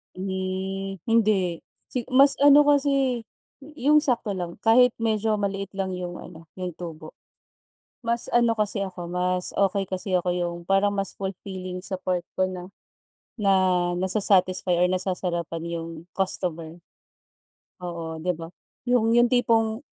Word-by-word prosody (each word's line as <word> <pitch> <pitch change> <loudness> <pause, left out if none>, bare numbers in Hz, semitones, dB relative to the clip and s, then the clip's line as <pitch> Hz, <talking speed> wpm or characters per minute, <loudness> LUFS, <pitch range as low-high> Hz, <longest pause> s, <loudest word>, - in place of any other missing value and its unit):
Hmm, 190 0 -4
hindi 200 -7 +2 0.3
si 250 -2 -3
mas 275 +2 +6
ano 285 +1 +7
kasi, 275 -5 +2 0.5
yung 300 +2 +3
sakto 250 -7 +1
lang, 175 +2 -6
kahit 245 +2 +5
medyo 220 -1 +1
maliit 195 0 -3
lang 195 -1 -2
yung 175 -1 -6
ano, 165 -1 -12
yung 180 -1 -4
tubo. 160 -3 -9 0.8
Mas 235 0 -2
ano 235 -1 +3
kasi 210 -1 0
ako, 185 -3 -5
mas 180 0 -1
okey 195 0 +2
kasi 185 0 -2
ako 180 0 0
yung 175 -1 -2
parang 200 +2 +2
mas 195 0 -1
fulfilling 185 -1 -6
sa 190 -1 -2
part 180 -1 -1
ko 185 0 0
na 185 +1 -8 0.6
na 200 -4 +2 0.5
nasa-satisfy 185 -2 +2
or 180 - +4
nasasarapan 180 -3 -2
yung 165 -1 -4 0.2
customer. 170 -3 -2 1.0
Oo, 165 -2 -6
di 180 +2 0
ba, 165 +1 -9 0.3
yung 235 -2 +2
yung 240 +1 +4
tipong 225 -2 +2
190 Hz, 135 wpm, -25 LUFS, 180-225 Hz, 1.0 s, ano